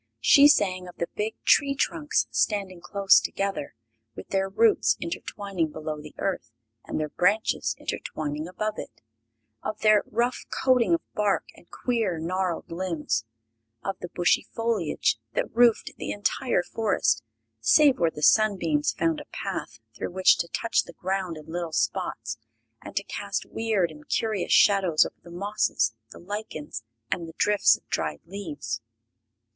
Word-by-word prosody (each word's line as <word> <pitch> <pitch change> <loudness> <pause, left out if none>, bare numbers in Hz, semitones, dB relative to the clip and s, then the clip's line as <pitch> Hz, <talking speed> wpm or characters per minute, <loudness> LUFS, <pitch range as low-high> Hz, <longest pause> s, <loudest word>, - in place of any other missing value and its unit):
She 285 0 +7
sang 185 -9 +2
of 175 - -11
the 170 - -2
big 215 +1 -2
tree 280 -1 +4
trunks, 150 - 0
standing 185 - 0
close 195 +1 +5
together, 195 - -3 0.4
with - - -9
their 195 0 0
roots 220 +3 +3
intertwining 170 -1 -3
below 155 -1 -5
the 150 0 -12
earth 190 -11 -2 0.3
and - - -4
their 155 -1 -2
branches 205 +8 +1
intertwining 150 +1 -4
above 215 +4 -3
it; - - -10 0.6
of 215 - -5
their 215 -1 +5
rough 240 +3 -1
coating 255 +4 +3
of 335 - -4
bark 210 -2 +1
and 170 - -20
queer, 230 -8 -1
gnarled 180 +1 -2
limbs; 165 - -2 0.6
of 195 - -2
the 180 - -6
bushy 175 0 +2
foliage 220 - 0
that - - -2
roofed 235 -2 +4
the - - -5
entire 205 +1 0
forest, 205 - +1 0.4
save 275 - +5
where 165 - +3
the 150 -1 -8
sunbeams 175 -9 +3
found 165 -1 0
a - - -9
path - - -5 0.2
through 120 - -4
which 190 0 +5
to 170 - -1
touch 230 +6 +1
the 170 - -12
ground 185 -1 -3
in 155 - -11
little 170 0 -4
spots 115 -1 -2 0.4
and - - -10
to 200 - 0
cast 200 0 -4
weird 215 -7 0
and 150 -1 -15
curious 215 -5 -1
shadows 190 -6 +5
over - - -9
the 170 - -14
mosses, 175 - 0 0.2
the - - -12
lichens 180 - -6 0.3
and 170 -2 -2
the 165 - -10
drifts 210 -1 +4
of - - -30
dried 80 -2 -2
leaves. 145 - -5
185 Hz, 155 wpm, -26 LUFS, 155-210 Hz, 0.6 s, She